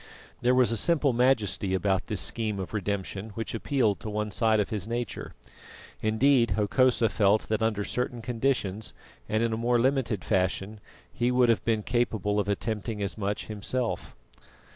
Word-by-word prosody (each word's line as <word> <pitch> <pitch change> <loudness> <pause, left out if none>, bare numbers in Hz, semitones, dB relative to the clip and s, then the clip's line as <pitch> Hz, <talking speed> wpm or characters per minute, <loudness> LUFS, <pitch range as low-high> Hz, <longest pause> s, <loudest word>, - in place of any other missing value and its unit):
There 125 +1 +3
was 125 -2 +4
a 115 - 0
simple 150 -1 +2
majesty 110 -6 +1
about 95 0 0
this 105 - -2
scheme 110 -3 -1
of 95 - -6
redemption 100 0 -3
which 115 - -4
appealed 115 -4 +1
to 110 - -6
one 105 0 -2
side 110 +1 +2
of 105 - 0
his 105 -2 -3
nature. 120 -2 -4 0.7
Indeed, 115 +3 +3
Hokosa 120 +3 +3
felt 105 0 +2
that 110 0 0
under 110 -2 +1
certain 125 +1 -3
conditions 110 -4 -1 0.3
and 110 +2 +1
in 115 -1 0
a - - -1
more 120 +1 +2
limited 125 -6 +1
fashion 95 +2 0 0.3
he 120 - +1
would 125 -1 +3
have 115 - +2
been 110 -2 0
capable 110 -4 0
of 100 -1 -1
attempting 105 +1 -2
as 100 -1 -3
much 100 -1 -3
himself. 110 +4 -3
110 Hz, 165 wpm, -27 LUFS, 105-120 Hz, 0.7 s, was